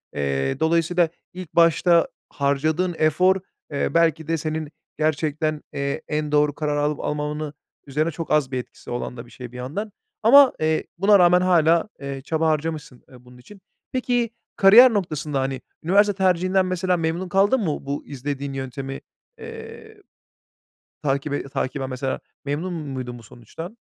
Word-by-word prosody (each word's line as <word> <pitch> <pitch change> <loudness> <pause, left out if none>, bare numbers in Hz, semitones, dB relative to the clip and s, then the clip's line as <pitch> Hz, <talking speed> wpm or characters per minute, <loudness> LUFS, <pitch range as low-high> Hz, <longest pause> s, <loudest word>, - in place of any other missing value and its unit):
Eee, 70 -1 -1
dolayısıyla 170 +1 +2 0.2
ilk 180 -3 -9
başta 170 0 +4 0.2
harcadığın 155 +5 0
efor, 180 +5 +3 0.4
eee, 140 - -1
belki 165 -2 +2
de 165 0 0
senin 155 -1 -4 0.3
gerçekten, 155 0 0
eee, 140 -1 -2
en 150 0 -2
doğru 150 0 +3
karar 150 -1 -1
alıp 145 0 0
almamanın 150 0 -3 0.3
üzerine 155 +4 0
çok 165 +1 -6
az 150 -4 +2
bir 130 - -2
etkisi 125 - -9
olan 120 +1 -4
da 120 - -8
bir 120 - -18
şey 125 -2 -9
bir 125 - -10
yandan. 165 - -5 0.3
Ama, 275 +3 +8
eee, 155 0 +1
buna 200 +2 +5
rağmen 180 0 +5
hâlâ, 170 0 +3
eee, 140 -1 -5
çaba 160 +3 0
harcamışsın, 155 -4 -2
eee, 125 -1 -16
bunun 125 0 -16
için. 195 +10 -15 0.3
Peki, 245 -2 0 0.3
kariyer 225 +6 +8
noktasında, 155 -7 -2
hani, 135 0 -2 0.2
üniversite 205 +5 +4
tercihinden, 185 0 +2
mesela, 185 0 0
memnun 165 +3 -2
kaldın 200 +7 +3
mı, 155 -9 -2
bu 140 +1 -4
izlediğin 140 0 -5
yöntemi, 135 0 -5 0.4
eee, 455 -1 -10 1.1
takibe 140 0 -1
takiben, 135 0 -3
mesela, 130 +1 -3 0.2
memnun 155 +6 -3
muydun 130 -6 -5
bu 115 - -14
sonuçtan? 160 - -10
155 Hz, 150 wpm, -23 LUFS, 140-180 Hz, 1.1 s, Ama